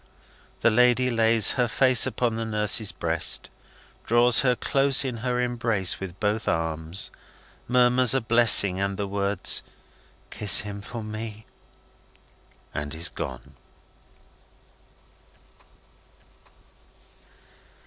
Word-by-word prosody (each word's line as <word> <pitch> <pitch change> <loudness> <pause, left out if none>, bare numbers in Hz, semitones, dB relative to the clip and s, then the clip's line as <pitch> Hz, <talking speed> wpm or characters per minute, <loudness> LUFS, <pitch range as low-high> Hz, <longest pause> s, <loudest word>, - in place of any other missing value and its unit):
The 120 - +3
lady 125 +2 +2
lays 115 -2 +2
her 125 -2 -1
face 130 +1 +3
upon 120 -2 -2
the 115 - -4
nurse's 105 -1 0
breast, 85 -1 -2 0.5
draws 120 0 +3
her 125 -1 +1
close 135 +2 +1
in 125 -3 -5
her 125 +2 -3
embrace 115 -6 -1
with 95 -1 -9
both 105 +1 -2
arms, 80 +2 -3 0.6
murmurs 125 0 +3
a - - +2
blessing 110 -4 +5
and 100 0 -3
the 100 - -3
words, 100 -1 -1 0.7
"Kiss 105 - +4
him 100 -1 -8
for 115 +2 -9
me!" 110 0 -8 1.3
and 75 +1 -6
is 80 +1 -2
gone. - - -9
110 Hz, 105 wpm, -24 LUFS, 100-125 Hz, 1.3 s, blessing